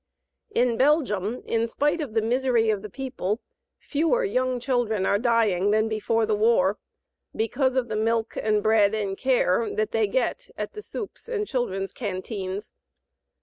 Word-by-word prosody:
In 245 - +1
Belgium, 250 - +1
in 230 0 0
spite 295 +7 0
of 250 -7 -5
the 220 - +2
misery 240 -1 +2
of 205 -2 -2
the 210 - -7
people, 240 -4 -3 0.4
fewer 330 +12 0
young 255 -9 0
children 235 -6 0
are 200 - +2
dying 220 -5 +2
than 215 +1 +3
before 220 +1 0
the 215 - 0
war, 210 -2 +3 0.6
because 255 +4 0
of 255 -2 +1
the 215 - -3
milk 225 +1 0
and 215 -1 +1
bread 220 -1 +4
and 200 -3 -2
care 235 -4 +2
that 215 0 0
they 225 -2 +2
get 260 - -1
at - - -4
the 425 - -7
"soupes" 425 +2 -8
and 425 -3 -1
children's 195 - -2
canteens. 195 -2 -5
225 Hz, 160 wpm, -25 LUFS, 210-255 Hz, 0.6 s, bread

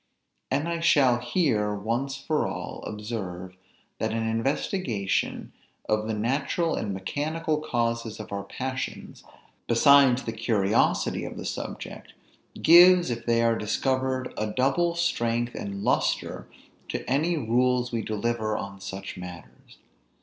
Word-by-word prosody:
And 145 +5 0
I 170 0 -2
shall 135 -7 +4
here, 120 - +1
once 120 +7 -2
for 150 +2 -1
all, - - -6
observe, 95 -4 -6 0.4
that - - -1
an 115 0 -1
investigation 115 - -1 0.3
of 110 0 0
the 110 - -1
natural 140 +9 0
and 105 - -2
mechanical 150 +11 -2
causes 115 -6 -2
of 110 - -8
our 100 0 -3
passions, 130 +6 -5 0.4
besides 130 +1 +5
the 115 - -3
curiosity 110 -3 +1
of - - -6
the - - -6
subject, - - -6 0.5
gives, 175 -1 +8
if 115 0 -5
they 115 0 +3
are 115 0 +3
discovered, 130 +4 -1
a 110 - 0
double 135 +9 +1
strength 120 -8 0
and 100 0 -5
lustre - - 0 0.4
to - - -4
any 160 +6 +1
rules 125 0 +1
we 115 -1 -1
deliver 110 0 -1
on 100 0 -7
such 95 0 -7
matters. 90 -1 -11
120 Hz, 130 wpm, -26 LUFS, 110-140 Hz, 0.5 s, gives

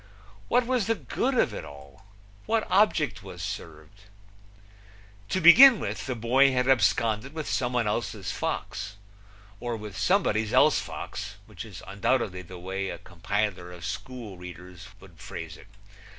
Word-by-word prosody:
What 245 - +3
was 245 -4 0
the 225 - +2
good 260 +4 -2
of 115 - +2
it - - -6
all? 70 +4 -14 0.4
What 225 -1 +1
object 155 - +2
was - - -9
served? 80 +6 -8 1.2
To 185 - 0
begin 230 +8 +9
with, - - -4
the 130 - -2
boy 130 +4 +4
had 125 0 +1
absconded 115 +1 +2
with 155 -2 -4
somebody 125 -3 0
else's 105 -2 -2
fox, 100 +1 -4 0.6
or 120 -1 -3
with 105 -2 -9
somebody's 105 +2 +1
else - - +5
fox, 100 0 -6
which 105 - -9
is 100 -6 -11
undoubtedly 100 -1 -1
the 90 +1 -11
way 95 +2 -4
a - - -5
compiler 95 0 -3
of 90 0 -9
school 105 -1 -6
readers 90 0 -10
would - - -17
phrase 80 -2 -7
it. - - -16
105 Hz, 150 wpm, -27 LUFS, 95-130 Hz, 1.2 s, begin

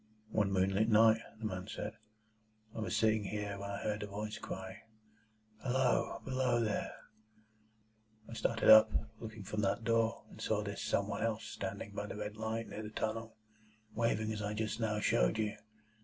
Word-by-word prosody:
"One 105 -2 +2
moonlight 95 +3 +2
night," 110 0 +6
said 110 - -16
the 110 - -5
man, 100 +2 -4 0.8
"I - - -4
was 110 - -1
sitting 110 -1 +3
here, 100 0 -3
when 100 0 -5
I 100 - -4
heard 105 -1 -1
a 105 - -4
voice 105 +1 -5
cry, 95 0 -6 0.8
'Halloa! 130 0 +1
Below 130 -2 +1
there!' 110 -3 -1 1.3
I - - -9
started 115 -1 +3
up, 110 0 +10 0.3
looked 110 -3 -8
from 105 +2 -2
that 100 +3 0
door, 115 0 +1
and - - -11
saw - - 0
this - - -4
Some - - +1
one - - -3
else 110 -1 0
standing 100 +1 -5
by 100 0 -4
the - - -6
red 105 0 -5
light 110 +1 -3
near 110 - -6
the 105 - -6
tunnel, 110 +1 -3 0.6
waving 110 -1 +1
as 105 - -4
I 105 +1 -2
just 110 +1 -2
now 105 -2 0
showed - - +3
you. 110 0 0
110 Hz, 175 wpm, -34 LUFS, 105-115 Hz, 1.3 s, up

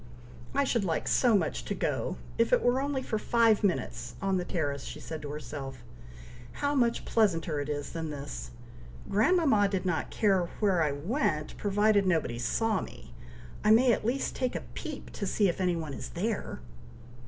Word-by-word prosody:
"I - - +4
should 235 -5 +1
like 165 -4 -1
so 235 -5 +4
much - - -2
to - - -2
go, - - -1 0.2
if - - +3
it - - +4
were 250 +2 +3
only 275 -2 -1
for 220 -4 -2
five 230 -2 +3
minutes, 125 -9 -1
on 195 -1 +1
the 180 - -1
terrace!" 145 -6 -2
said 160 +3 -7
she - - -13
to 145 - -6
herself. 140 -4 -6 0.7
"How 285 0 -1
much 240 -4 +1
pleasanter 170 -8 +1
it 145 +1 -3
is 145 -1 -3
than 165 -1 -4
this. 140 - -6 0.6
Grandmama 220 - +4
did 195 -2 -2
not 175 -3 -1
care 190 -5 +2
where 195 -5 +3
I 150 -2 +2
went, 155 - -1
provided 205 0 +2
nobody 160 -9 +1
saw 220 - +1
me! - - -10 0.5
I 215 - +3
may 240 +3 +6
at - - -1
least 250 +5 -1
take 255 -1 -1
a - - -2
peep - - -7
to 200 - -4
see 205 +1 +2
if 180 +1 -1
any 180 -1 +2
one 160 -4 -4
is - - -6
there!" 200 - -3
190 Hz, 185 wpm, -29 LUFS, 150-225 Hz, 0.7 s, may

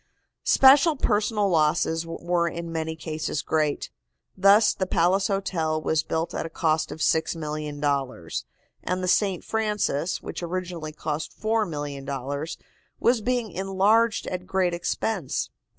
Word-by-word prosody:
Special 280 +4 +6
personal 210 -4 +1
losses 160 -1 +1
were 170 +1 0
in 170 0 -5
many 160 0 -3
cases 155 -2 -3
great. 155 -2 0 0.4
Thus 200 +3 +5
the 190 - -2
Palace 185 +3 +2
Hotel 180 -6 -1
was 155 0 +1
built 160 +1 -2
at - - -2
a 165 - -6
cost 155 -1 0
of 160 - -7
$6,000,000, 150 - -1 0.4
and 185 +1 -2
the - - -1
St. 190 -1 +2
Francis, 210 -7 -1
which - - -7
originally 175 -2 -4
cost 155 0 -5
$4,000,000, 145 - -2 0.4
was 240 -1 +3
being 240 -2 -1
enlarged 195 +5 +2
at 180 0 -5
great 185 -2 +1
expense. 175 -1 -2
170 Hz, 125 wpm, -25 LUFS, 155-195 Hz, 0.4 s, Special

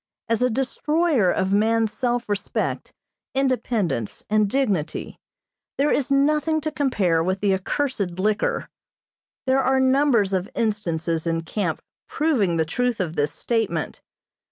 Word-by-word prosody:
As 230 0 0
a 250 - +3
destroyer 270 - +1
of 190 +1 0
man's 220 +1 +2
self 245 -2 -1
respect, 205 0 -2 0.4
independence, 235 - -1
and 215 -1 +3
dignity, 200 - -1 0.6
there 290 +2 +2
is 275 - +1
nothing 300 +3 +2
to 310 - -2
compare 200 - +1
with 185 +2 -1
the 200 -1 +2
accursed 195 -2 -2
liquor. 210 +3 0 0.8
There 265 0 +3
are 265 0 +2
numbers 260 -6 +3
of 185 0 -1
instances 170 -7 -1
in 165 0 0
camp 165 -1 -3 0.3
proving 235 - +1
the 160 - +2
truth 245 +7 -1
of 170 -3 -2
this 145 -1 0
statement. 225 +5 -2
220 Hz, 130 wpm, -23 LUFS, 185-265 Hz, 0.8 s, a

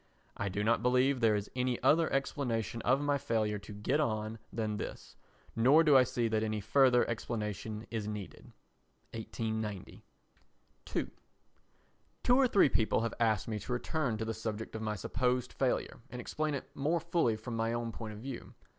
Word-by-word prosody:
I 100 - -2
do 100 +2 -2
not 115 +1 +3
believe 125 +2 +3
there 115 -3 +4
is 105 0 -3
any 125 -1 0
other 160 +1 +4
explanation 120 - -1
of 130 +5 +2
my 145 -1 +1
failure 110 -6 0
to 100 +2 -11
get 105 +8 0
on 110 -5 -1
than 110 -2 -2
this, - - -7 0.4
nor 135 +8 +6
do 150 -3 +5
I 130 - +9
see 120 -1 0
that 110 -1 +1
any 110 -1 -1
further 125 +3 +4
explanation 110 -1 -4
is 110 -3 -3
needed. 105 -2 -7 0.6
[1890.] 110 -3 -4 0.9
ii - - +1 1.2
Two 245 - +5
or 265 0 +5
three 200 -9 +5
people 115 -4 +1
have 115 - -1
asked 110 -5 +2
me 110 -2 -2
to 125 - -4
return 125 -2 -1
to 110 - -3
the 115 - -2
subject 110 0 -5
of 110 - -4
my 110 -1 -2
supposed 125 +5 -1
failure - - -1
and 125 - -7
explain 155 +4 -2
it 140 - -8
more 155 +5 +1
fully 165 -8 +1
from 115 +2 -6
my 115 0 0
own 120 0 -2
point 110 -1 -6
of - - -9
view. 135 0 -7
115 Hz, 180 wpm, -32 LUFS, 110-130 Hz, 1.2 s, I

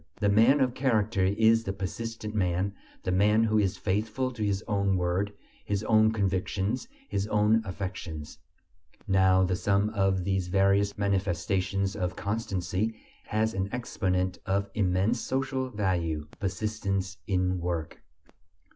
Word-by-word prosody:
The 105 -2 +2
man 115 +8 +5
of 125 -2 +2
character 110 -7 +1
is 110 +3 +4
the 95 - -3
persistent 110 +3 -5
man, 95 -1 0 0.3
the 90 - -1
man 105 +4 +4
who 110 -1 +3
is 100 -1 0
faithful 105 +7 -1
to 115 -3 -4
his 100 0 0
own 100 -3 +1
word, 90 +3 0 0.3
his 100 0 -2
own 110 0 +4
convictions, 100 - -1 0.2
his 100 +1 -2
own 105 +1 +3
affections. 85 -6 -6 0.7
Now 95 -1 +4
the 90 0 +1
sum 100 +2 +1
of 95 -3 +1
these 95 -1 0
various 100 +2 +2
manifestations 95 0 0
of 90 -1 -2
constancy 100 0 -2 0.3
has 110 0 0
an 95 -1 -2
exponent 95 -7 -1
of 100 0 0
immense 100 +4 +1
social 130 0 -1
value: 90 -8 -1
persistence 100 -1 -2
in 90 -2 +1
work. 85 -3 -3
100 Hz, 135 wpm, -28 LUFS, 95-110 Hz, 0.7 s, man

